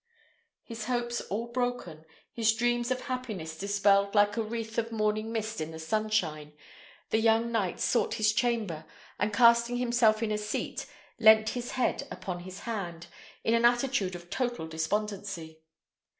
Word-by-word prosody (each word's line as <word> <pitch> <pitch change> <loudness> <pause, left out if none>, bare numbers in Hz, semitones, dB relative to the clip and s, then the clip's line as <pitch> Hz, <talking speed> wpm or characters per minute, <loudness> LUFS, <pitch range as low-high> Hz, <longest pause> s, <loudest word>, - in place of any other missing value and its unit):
His 230 -2 -7
hopes 240 -1 -1
all 230 +4 -3
broken, 245 -11 -3 0.3
his 225 -1 +3
dream 240 +1 +1
of 255 0 -1
happiness 220 -12 -5
dispelled 200 +1 +2
like 205 0 +4
a 230 - 0
wreath 225 0 -3
of 230 0 -3
morning 215 0 0
mist 220 -3 -3
in 155 - -3
the 160 - -8
sunshine, 160 -5 -1 0.6
the 220 - +3
young 225 +1 +3
knight 205 -6 -1
sought 240 - +1
his 215 0 +2
chamber, 215 -10 -1 0.3
and 205 +2 +1
casting 235 +2 +5
himself 235 -3 +3
in 215 - -1
a 210 - 0
seat, 210 0 -4 0.3
leant 220 -1 +7
his 245 -1 -4
head 255 -2 0
upon 180 -3 -5
his 185 +2 -9
hands, 175 -8 -5 0.4
in 225 - +2
an 230 0 +3
attitude 240 -6 +2
of 175 0 -11
total 240 -9 -2
despondency. 170 0 -3
215 Hz, 155 wpm, -29 LUFS, 195-235 Hz, 0.6 s, leant